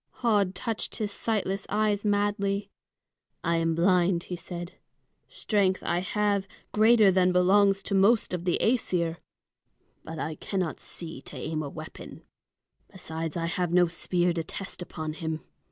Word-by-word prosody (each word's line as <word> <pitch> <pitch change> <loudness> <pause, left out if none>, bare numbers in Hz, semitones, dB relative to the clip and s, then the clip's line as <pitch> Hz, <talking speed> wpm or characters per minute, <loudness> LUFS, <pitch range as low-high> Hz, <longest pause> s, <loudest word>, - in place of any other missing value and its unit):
Höd 205 -5 +3
touched 225 -3 -3
his 210 -2 -2
sightless 200 -2 -2
eyes 210 -1 +1
madly. 205 -1 0 0.7
"I 170 0 +2
am 165 0 +1
blind," 175 0 +3
he 180 - -5
said. 175 0 -6 0.6
"Strength 195 -3 +1
I 175 - +1
have, 200 +1 0 0.2
greater 215 -1 +6
than 185 -1 +3
belongs 195 +2 +4
to - - -4
most 200 +2 +4
of 175 -1 -2
the 175 -1 +1
Æsir. 180 -8 +1 0.9
But 160 0 -7
I 155 0 -3
cannot 185 -5 -2
see 160 -5 -7
to - - -10
aim 155 0 -3
a 145 - -4
weapon. 155 +2 -10 0.7
Besides, 165 -4 -5
I 165 - -1
have 175 +1 -1
no 180 0 +5
spear 175 +1 0
to 165 -1 -2
test 185 +3 -7
upon 160 -3 -5
him. 160 -1 -4
185 Hz, 150 wpm, -28 LUFS, 170-205 Hz, 0.9 s, greater